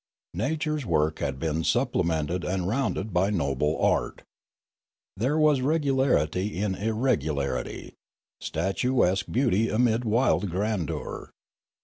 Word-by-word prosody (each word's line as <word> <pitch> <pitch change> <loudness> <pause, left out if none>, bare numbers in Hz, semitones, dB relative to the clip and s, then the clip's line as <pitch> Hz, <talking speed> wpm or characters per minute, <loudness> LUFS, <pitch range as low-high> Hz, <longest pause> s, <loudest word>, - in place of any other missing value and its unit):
Nature's 150 - -1
work 80 -6 0
had - - -2
been 80 +3 -1
supple - - +1
mented 85 +2 -1
and 90 -1 -1
rounded 110 -3 -1
by 95 +3 +2
noble 75 -5 0
art. - - 0 0.9
There 130 +9 0
was 155 -3 +4
regu 145 +1 +1
larity 105 - +1
in 100 +1 -1
irregularity, 90 - -2 0.5
statuesque 95 +2 0
beauty 115 -4 +2
amid 115 +1 +2
wild 110 -3 +2
grandeur. 95 -2 -3
100 Hz, 110 wpm, -26 LUFS, 80-125 Hz, 0.9 s, was